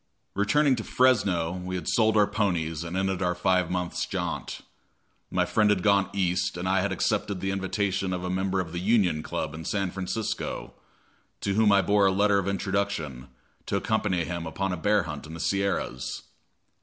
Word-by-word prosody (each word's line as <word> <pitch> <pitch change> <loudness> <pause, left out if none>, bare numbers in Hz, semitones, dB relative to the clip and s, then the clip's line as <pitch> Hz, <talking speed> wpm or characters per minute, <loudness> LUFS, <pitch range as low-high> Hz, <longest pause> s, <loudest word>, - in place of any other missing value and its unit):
Returning 130 +8 +3
to 110 - -3
Fresno, 100 -12 +2
we 90 0 -5
had 90 - -5
sold 110 -2 +3
our 105 - +6
ponies 85 -6 -1
and 85 +2 -4
ended 95 -1 0
our 90 -1 +1
five 90 0 +2
months' 90 -1 -2
jaunt. - - -4 0.7
My - - +1
friend 105 -1 +2
had 95 -4 +2
gone 100 -2 +3
East, 90 -2 0
and 90 +1 -3
I 95 0 +2
had 100 +1 -1
accepted 95 +1 0
the 95 +1 -1
invitation 95 0 -1
of 90 -1 -3
a 90 - -2
member 95 +1 0
of 85 -3 -3
the 85 - -3
Union 95 -6 +2
Club 70 - -4
in 80 0 -7
San 95 +2 -1
Francisco, 95 +4 -3 0.7
to 100 - 0
whom 105 0 +4
I 100 -1 +5
bore 100 -1 +4
a - - +3
letter 100 +1 +3
of 95 - -3
introduction, 100 -10 -2 0.4
to - - -1
accompany 105 -5 0
him 85 -1 -4
upon 95 +3 -2
a - - 0
bear 100 +3 +2
hunt 75 -1 -7
in 80 - -8
the - - -8
Sierras. 85 -7 -1
95 Hz, 190 wpm, -27 LUFS, 90-100 Hz, 0.7 s, our